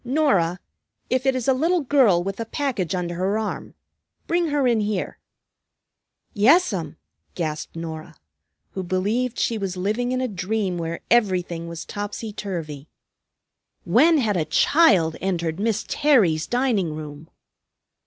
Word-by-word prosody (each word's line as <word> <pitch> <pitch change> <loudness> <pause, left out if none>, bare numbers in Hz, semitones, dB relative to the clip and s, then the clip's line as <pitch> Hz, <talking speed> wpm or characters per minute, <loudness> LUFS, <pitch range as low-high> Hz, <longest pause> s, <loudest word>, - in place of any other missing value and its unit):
"Norah, 240 - +1 0.5
if 255 +1 +1
it 265 - +3
is 255 -1 -3
a 265 - +5
little 330 +6 +1
girl 250 -11 +3
with 195 +2 -5
a 230 - -2
package 225 - -2
under 175 -1 -3
her 190 +4 0
arm, 220 -1 -4 0.5
bring 345 0 +1
her 290 -3 +1
in 235 -2 +2
here." 205 -3 -2 1.1
"Yes'm!" 205 - +3 0.4
gasped 155 -3 -4
Norah, 160 -1 -7 0.6
who 190 - -4
believed 210 +7 -1
she 230 -2 0
was 190 -2 -4
living 215 +7 -1
in 255 - 0
a 255 - 0
dream 195 -2 -2
where 165 0 -4
everything 180 -7 +1
was 170 -1 -7
topsy 205 +1 -5
turvy. 160 -8 -6 1.0
When 325 0 +4
had 215 -8 +1
a 160 - 0
child 175 - +3
entered 170 -3 -2
Miss 220 0 -1
Terry's 210 - +2
dining 230 -11 0
room! 150 0 -9
200 Hz, 140 wpm, -23 LUFS, 170-250 Hz, 1.1 s, a